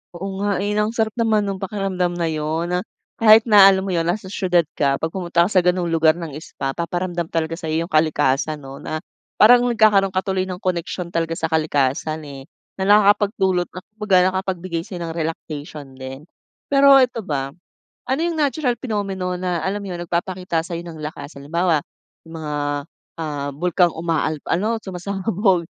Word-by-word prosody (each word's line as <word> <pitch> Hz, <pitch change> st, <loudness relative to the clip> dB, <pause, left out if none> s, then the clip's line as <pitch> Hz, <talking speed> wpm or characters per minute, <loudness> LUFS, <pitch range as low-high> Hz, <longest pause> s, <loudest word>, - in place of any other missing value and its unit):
Oo 190 Hz, +2 st, -5 dB
nga 200 Hz, -1 st, 0 dB
eh, 205 Hz, -, -1 dB
na 210 Hz, 0 st, +1 dB
ang 225 Hz, -, -6 dB
sarap 220 Hz, -1 st, +1 dB
naman 220 Hz, -2 st, +2 dB
nung 195 Hz, -1 st, -3 dB
pakiramdam 190 Hz, -3 st, -2 dB
na 170 Hz, -2 st, -1 dB
'yon 155 Hz, +3 st, -2 dB
na, 180 Hz, -, +1 dB, 0.4 s
kahit 220 Hz, 0 st, +7 dB
na 205 Hz, -4 st, +8 dB
alam 190 Hz, -1 st, +4 dB
mo 195 Hz, -, -3 dB
'yon, 165 Hz, -1 st, 0 dB
nasa 190 Hz, +2 st, -2 dB
siyudad 180 Hz, -4 st, +2 dB
ka, 140 Hz, -2 st, +1 dB
'pag 160 Hz, +3 st, -3 dB
pumunta 175 Hz, -2 st, +1 dB
ka 180 Hz, -, 0 dB
sa 190 Hz, -, +5 dB
ganong 180 Hz, -1 st, +1 dB
lugar 160 Hz, -1 st, +4 dB
ng 165 Hz, -3 st, -6 dB
spa, 135 Hz, -3 st, -5 dB
paparamdam 175 Hz, +2 st, -3 dB
talaga 165 Hz, 0 st, -2 dB
sa 160 Hz, -, -6 dB
iyo 160 Hz, +1 st, 0 dB
'yong 170 Hz, -, -10 dB
kalikasan 155 Hz, -1 st, +2 dB
'no, 135 Hz, +1 st, -9 dB
na 155 Hz, 0 st, -5 dB, 0.3 s
parang 245 Hz, +3 st, +6 dB
nagkakaroon 210 Hz, -4 st, +3 dB
ka 185 Hz, -, +1 dB
tuloy 190 Hz, -1 st, -1 dB
ng 185 Hz, 0 st, -7 dB
koneksyon 180 Hz, -1 st, -3 dB
talaga 165 Hz, 0 st, -1 dB
sa 160 Hz, 0 st, -3 dB
kalikasan 155 Hz, 0 st, 0 dB
eh, 140 Hz, -2 st, -9 dB, 0.4 s
na -, -, 0 dB
nakakapagdulot 200 Hz, -3 st, +3 dB
ng, 185 Hz, -, -10 dB, 0.2 s
kumbaga 205 Hz, -3 st, +3 dB
nakapagbigay 185 Hz, -3 st, -3 dB
sa'yo 180 Hz, -5 st, -6 dB
ng 165 Hz, -, -4 dB
relaxation 155 Hz, -2 st, -5 dB
din. 135 Hz, +2 st, -8 dB, 0.5 s
Pero 275 Hz, 0 st, +7 dB
ito 245 Hz, -2 st, -2 dB
ba, 140 Hz, -8 st, -3 dB, 0.5 s
ano 265 Hz, +3 st, -1 dB
yung 335 Hz, -1 st, -1 dB
natural 285 Hz, -3 st, +1 dB
phenomenon 195 Hz, -7 st, -3 dB
na 180 Hz, -3 st, -2 dB
alam 200 Hz, +3 st, -1 dB
mo 200 Hz, -, -7 dB
'yon? 175 Hz, -, -5 dB
Nagpapakita 175 Hz, -1 st, -2 dB
sayo 170 Hz, -1 st, -5 dB
ng 165 Hz, -2 st, -9 dB
lakas? 150 Hz, -1 st, -7 dB
Halimbawa, 165 Hz, +2 st, +1 dB, 0.5 s
yung 165 Hz, -, -10 dB
mga, 150 Hz, -1 st, -4 dB, 0.7 s
ah, 145 Hz, -2 st, -3 dB
bulkang 175 Hz, +1 st, +2 dB
umaal 160 Hz, -1 st, -1 dB, 0.2 s
ano, 220 Hz, +6 st, 0 dB
sumasabog 190 Hz, 0 st, 0 dB
180 Hz, 180 wpm, -21 LUFS, 160-195 Hz, 0.7 s, na